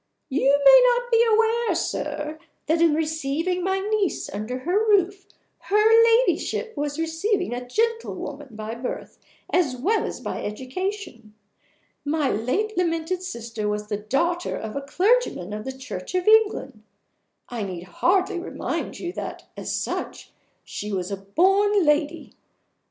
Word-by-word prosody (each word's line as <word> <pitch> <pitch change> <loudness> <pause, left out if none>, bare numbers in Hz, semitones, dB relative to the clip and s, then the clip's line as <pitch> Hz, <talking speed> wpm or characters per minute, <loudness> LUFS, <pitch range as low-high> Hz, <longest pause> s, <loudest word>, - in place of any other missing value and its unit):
You 280 +1 +3
may - - +10
not 485 0 -4
be 460 0 +5
aware, 455 +1 +2
sir, 305 +1 -3 0.3
that 325 +2 +1
in 330 -3 +5
receiving 320 +3 -1
my 380 +1 +1
niece 410 -1 -1
under 215 +5 -4
her 365 +9 +1
roof 390 -1 +2 0.3
her 440 +3 +5
Ladyship 460 0 +2
was 290 0 -3
receiving 325 - -1
a 245 0 -5
gentlewoman 430 - -2
by 215 +1 -5
birth 240 +2 -6 0.3
as 310 -8 +2
well 410 - +1
as - - -6
by - - -5
education. 255 - -5 0.7
My 290 -1 0
late 355 - -1
lamented 345 0 -1
sister 230 - -5
was 210 0 -3
the 205 - -1
daughter 335 +12 -1
of 220 -1 -6
a 280 - -2
clergyman 355 - +1
of 215 0 -5
the 265 - -3
Church 255 - -6
of 365 +1 0
England. 440 -1 +3 0.7
I 240 -2 -4
need 185 -4 -5
hardly 355 - +1
remind 350 - -4
you 350 0 -5
that, - - -6
as - - -5
such, - - -4 0.3
she 210 - -6
was 185 -1 -3
a 200 - -2
born 385 - +3
lady. 295 +2 0
325 Hz, 145 wpm, -24 LUFS, 250-400 Hz, 0.7 s, may